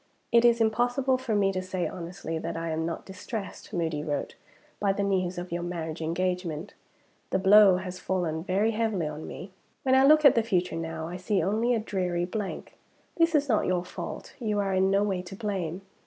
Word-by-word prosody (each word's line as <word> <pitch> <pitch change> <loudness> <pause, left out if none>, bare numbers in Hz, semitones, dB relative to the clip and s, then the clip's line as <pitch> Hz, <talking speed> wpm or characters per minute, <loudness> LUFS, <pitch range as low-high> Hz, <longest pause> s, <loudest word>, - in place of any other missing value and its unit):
"It 235 0 +5
is 235 -1 +5
impossible 245 +4 +2
for 235 -4 -1
me 195 -1 +3
to 185 -1 -2
say 185 -1 -2
honestly 170 -2 -5
that - - -4
I 165 0 -3
am 160 +1 -1
not 165 - -5
distressed 200 +2 -7
(Moody 165 -6 -1
wrote) 145 -2 -3 0.5
by 200 -1 +2
the 200 - -1
news 185 -2 0
of 175 0 -5
your 175 0 -2
marriage 165 -2 -4
engagement. 180 +1 -2 0.6
The - - +1
blow 195 0 +7
has 185 0 -6
fallen 170 -4 -2
very 200 +5 +1
heavily 215 -6 0
on 150 +1 -5
me. 190 - -8 0.3
When 260 - +2
I 265 0 +6
look 305 +2 +6
at 280 - +9
the 230 - +3
future 180 -6 0
now, 165 -1 -4
I 175 +2 -5
see 185 0 0
only 225 +6 +1
a - - +1
dreary 180 -5 -1
blank. 200 +2 -5 0.4
This 330 -1 +3
is 290 -1 +3
not 220 -5 +2
your 180 -1 0
fault - - -7
you 215 -4 -1
are 195 -1 0
in 190 +1 +3
no 195 +1 +3
way 195 -3 -1
to 180 +1 -9
blame. 190 -5 -3
190 Hz, 205 wpm, -27 LUFS, 175-215 Hz, 0.6 s, at